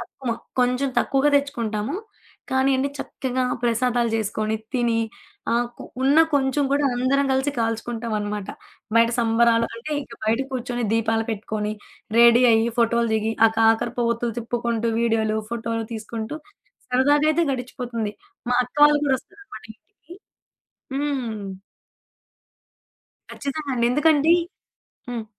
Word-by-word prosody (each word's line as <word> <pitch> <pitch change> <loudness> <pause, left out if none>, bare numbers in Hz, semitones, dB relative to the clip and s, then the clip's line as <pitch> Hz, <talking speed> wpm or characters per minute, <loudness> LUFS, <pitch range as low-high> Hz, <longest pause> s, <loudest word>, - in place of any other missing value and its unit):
తక్కువ. 240 +1 -6 0.3
కొంచెం 250 +2 +2
తక్కువగా 275 +2 +2
తెచ్చుకుంటాము. 235 -4 -2 0.6
కాని 265 +1 +2
అన్ని 275 +2 -1
చక్కగా 260 -1 -3 0.2
ప్రసాదాలు 240 0 +1
జేసుకొని 215 0 -1 0.2
తిని, 235 -3 +1 0.5
ఆహ్, 240 +1 +2
కు - - -8 0.2
ఉన్న 275 +4 +4 0.2
కొంచెం 280 +1 +2
కూడా 285 +1 +2
అందరం 270 +3 +2
కలిసి 265 +2 +1
కాల్చుకుంటాం 230 0 -2
అన్నమాట. 205 -1 -4 0.5
బయట 230 0 +5
సంబరాలు 230 0 +3
అంటే 230 +7 -8
ఇంక 235 - -14
బయట 225 +3 +1
కూర్చొని 245 -1 -3
దీపాలు 225 0 +1
పెట్టుకొని, 215 0 -3 0.5
రెడీ 235 +1 +7
అయ్యి 225 +1 +3
ఫోటోలు 235 0 +2
దిగి, 220 +1 0
ఆ - - +5
కాకర 225 +1 +3
పోవొత్తులు 235 -1 0
తిప్పుకుంటూ, 235 -1 -1
వీడియోలు 220 -2 +1
ఫోటోలు 230 -1 -3
తీసుకుంటూ, 225 +4 -5 0.5
సరదాగాయితే 290 +6 +3
గడిచిపోతుంది. 245 -4 -4 0.4
మా 245 - +3
అక్క 245 - -19
వాళ్ళు 295 0 +5
గూడా 270 -2 +2
వస్తారన్నమాట 405 - -14
ఇంటికి. 340 - -18 0.8
హ్మ్. 260 -7 -2 1.9
ఖచ్చితంగండి 275 -4 -2
ఎందుకండి 295 +3 +3 0.8
హ్మ్. 235 -3 -4
235 Hz, 120 wpm, -23 LUFS, 225-270 Hz, 1.9 s, రెడీ